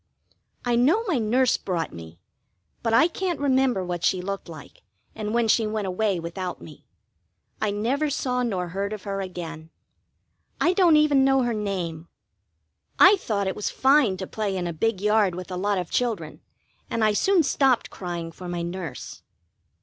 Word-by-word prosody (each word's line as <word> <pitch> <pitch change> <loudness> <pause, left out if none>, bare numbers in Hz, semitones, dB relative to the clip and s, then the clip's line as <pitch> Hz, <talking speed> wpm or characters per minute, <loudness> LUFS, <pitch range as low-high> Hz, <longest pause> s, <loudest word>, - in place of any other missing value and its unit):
I 240 -1 +2
know 300 - +3
my 335 - 0
nurse 240 +3 +2
brought 170 -4 -3
me, 80 0 -10 0.6
but 230 - -1
I 230 +9 +5
can't 350 -1 -3
remember 260 -8 +2
what 175 -1 -4
she 185 - +2
looked 195 0 -5
like, 155 -3 -12 0.3
and 210 -1 -4
when 235 0 +1
she 220 0 +3
went 215 -1 -2
away 190 0 0
without 175 +2 -5
me: - - -14 0.7
I 215 - +1
never 245 +9 0
saw 250 -3 -1
nor 190 -7 -2
heard 200 +4 -3
of 210 -3 -7
her 195 -1 -3
again. 165 -4 -7 0.9
I 350 - +3
don't 360 -4 +5
even 295 -3 +4
know 270 -1 +3
her 240 -1 0
name. 180 -6 -3 0.9
I 380 +3 +8
thought 210 - -2
it 190 - -2
was 210 - -2
fine 265 -8 +3
to 190 - -5
play 200 -1 -3
in 180 - -2
a 170 - -3
big 205 +4 -1
yard 210 -3 +2
with 185 +1 -7
a - - -3
lot 200 +2 0
of 180 -2 -4
children, 210 -11 -2 0.5
and 230 - -1
I 215 -1 +3
soon 370 - +3
stopped 270 -3 +2
crying 175 -2 -5
for 180 +2 -9
my 175 -1 -3
nurse. 170 -6 -6
205 Hz, 180 wpm, -25 LUFS, 180-250 Hz, 0.9 s, I